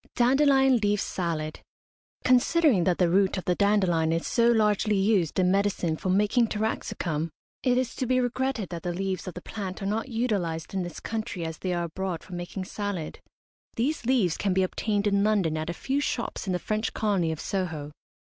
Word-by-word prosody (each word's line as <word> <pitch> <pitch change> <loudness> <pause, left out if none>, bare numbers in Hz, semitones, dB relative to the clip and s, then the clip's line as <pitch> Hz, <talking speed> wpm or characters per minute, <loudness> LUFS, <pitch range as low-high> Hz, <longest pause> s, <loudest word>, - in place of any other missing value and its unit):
DANDELION 270 +1 +4
LEAF 205 -2 +1
SALAD. 160 -5 -3 0.6
Considering 255 - +4
that 180 -2 +2
the 180 - +3
root 190 +3 +2
of 185 - -5
the 180 - +2
dandelion 185 -5 +2
is 165 0 -1
so 235 0 +3
largely 210 -2 +2
used 195 -4 +2
in 185 -1 +3
medicine 195 -4 +1
for 185 - -4
making 210 +5 +3
taraxacum, 175 -7 -2 0.3
it 250 -2 +2
is 255 -2 0
to 255 - -1
be 255 +1 +3
regretted 250 -4 -1
that 170 -2 -5
the 175 +1 -3
leaves 190 0 -3
of 185 - -6
the 180 - -8
plant 195 -4 -5
are 195 - -5
not 220 +5 -1
utilised 200 -10 -2
in 190 - 0
this 175 -1 -6
country 215 -6 -4
as 160 -1 -5
they 185 - -2
are 175 -1 0
abroad 175 0 -4
for 185 - -12
making 175 +2 -5
salad. 200 -6 -4 0.6
These 245 +1 -1
leaves 225 -11 +2
can 195 -2 0
be 190 - +3
obtained 205 +2 -1
in 200 -1 +2
London 200 -7 +2
at 155 +1 -3
a - - 0
few 265 +10 -1
shops 235 -6 -3
in 185 - 0
the - - +1
French 215 +4 -2
colony 195 -6 +1
of 160 - -5
Soho. 160 -7 -3
195 Hz, 200 wpm, -27 LUFS, 175-225 Hz, 0.6 s, DANDELION